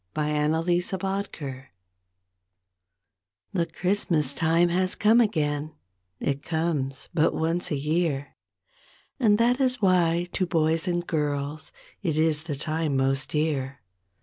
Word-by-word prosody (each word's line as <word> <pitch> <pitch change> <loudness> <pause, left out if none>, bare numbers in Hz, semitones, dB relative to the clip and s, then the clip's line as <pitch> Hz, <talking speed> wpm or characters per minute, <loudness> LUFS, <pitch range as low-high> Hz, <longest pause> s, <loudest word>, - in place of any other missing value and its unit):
2 155 - 0
1 150 0 +1
WHAT 165 +1 -1
CHRISTMAS 175 +3 +1 0.5
MEANS 135 -3 -6 1.9
The 175 -3 +1
Christmas 165 -5 0
time 165 +3 +2
has 185 +2 +1
come 225 +3 +5
again, 155 -7 -1 0.4
It 140 0 -1
comes 155 -5 -2
but 160 -2 +2
once 165 +2 -1
a 150 - -1
year, 150 -1 -1 0.9
And 210 -5 +4
that 245 +4 +2
is 255 -1 +1
why 175 -3 +2
to 185 - 0
boys 160 0 +1
and 175 -1 -1
girls 145 -1 -2 0.3
It 160 -5 -1
is 155 0 +1
the 150 -4 -3
time 155 0 -1
most 135 +1 +1
dear. 140 -4 -2
160 Hz, 130 wpm, -26 LUFS, 145-175 Hz, 1.9 s, come